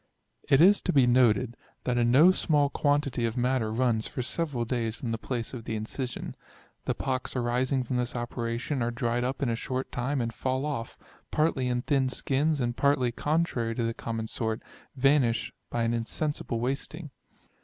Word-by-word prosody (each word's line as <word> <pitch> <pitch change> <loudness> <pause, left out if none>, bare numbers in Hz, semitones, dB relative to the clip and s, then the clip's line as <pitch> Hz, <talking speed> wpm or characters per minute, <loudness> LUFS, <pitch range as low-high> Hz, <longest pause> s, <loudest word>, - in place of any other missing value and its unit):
It 135 0 +6
is 200 +4 +6
to - - 0
be 135 -6 +5
noted, 120 -1 +3 0.3
that 125 -1 0
a - - +3
no 135 +10 +6
small 145 -6 +2
quantity 145 -4 +1
of 115 +2 -4
matter 125 -3 +1
runs 115 -1 +1
for 125 - -4
several 135 -2 -1
days 115 -2 -1
from 115 +1 -4
the 115 - -2
place 120 -1 -3
of 115 -3 -7
the 110 - -3
incision. 120 +4 -4 0.5
The - - 0
pocks 130 -1 -2
arising 125 +2 +1
from 125 +1 -2
this 125 0 -2
operation 120 +2 -2
are 120 - +1
dried 120 0 -1
up 130 +3 -2
in 130 - +1
a 115 - +1
short 130 +3 -3
time, 130 +3 -1
and 115 -1 -2
fall 130 +2 -1
oflT, 140 -6 -4 0.3
partly 150 -5 +1
in 125 0 0
thin 135 -3 +2
skins, 145 +4 0
and 120 -2 -1
partly 140 -3 +2
contrary 140 -5 0
to 120 - -1
the 115 0 0
common 115 -1 -4
sort, 110 0 -3 0.3
vanish 130 -4 +2 0.2
by 120 - -1
an 115 0 +1
insensible 120 +1 -2
wasting. 135 +5 -3
125 Hz, 185 wpm, -28 LUFS, 115-140 Hz, 0.5 s, It